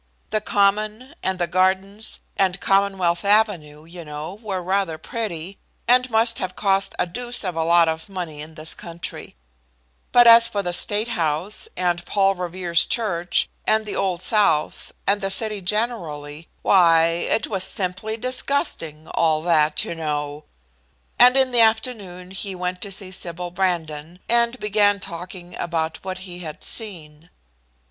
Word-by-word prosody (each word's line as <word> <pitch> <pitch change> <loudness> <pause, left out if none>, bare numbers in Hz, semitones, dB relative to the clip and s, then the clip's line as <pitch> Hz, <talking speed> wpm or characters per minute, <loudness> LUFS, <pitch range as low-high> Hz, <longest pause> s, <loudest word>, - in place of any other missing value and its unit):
The 215 - 0
Common, 215 +5 0
and 190 0 -1
the 175 - 0
Gardens, 190 +4 0
and 190 -1 +1
Commonwealth 195 -3 +1
Avenue, 195 -8 +1
you 170 +1 -10
know, 150 +3 -7
were 195 -5 -4
rather 190 -3 0
pretty, 195 -4 -6 0.3
and 250 +1 +4
must 230 +1 +3
have 185 -1 -4
cost 195 -1 +1
a - - +1
deuce 245 +7 -2
of 180 -3 -3
a 165 - 0
lot 170 0 +4
of 160 +4 -3
money 175 -6 -6
in 155 +1 -10
this 155 +1 -4
country; 170 0 -9 0.8
but 245 0 +7
as 230 0 +9
for 200 -2 -2
the 175 -1 -2
State 210 +5 0
House, 165 +1 -1
and 175 -1 0
Paul 195 -1 +2
Revere's 180 -2 0
Church, 175 -7 0 0.2
and 220 0 +3
the 210 - -4
Old 185 -2 -1
South, 190 -7 +2
and 205 +1 +2
the 195 - -1
city 210 0 +1
generally, 170 -8 -3 0.2
why, 170 -4 +5 0.3
it 220 - +1
was 195 -3 -2
simply 190 +3 -2
disgusting, 255 - -2
all 160 -2 +1
that, 155 -3 +2
you - - -4
know. 150 -2 -4 0.7
And 250 +2 +7
in 265 -1 +3
the 240 -1 +5
afternoon 220 -6 0
he 195 0 -4
went 180 0 -3
to 200 - -4
see 190 -1 -5
Sybil 180 -1 -5
Brandon, 170 -3 -2
and 235 +1 +2
began 205 -1 +2
talking 180 -1 -8
about 160 -2 -3
what 185 0 -4
he 180 -1 -8
had 155 -4 -8
seen. 165 -7 -5
185 Hz, 155 wpm, -22 LUFS, 170-210 Hz, 0.8 s, as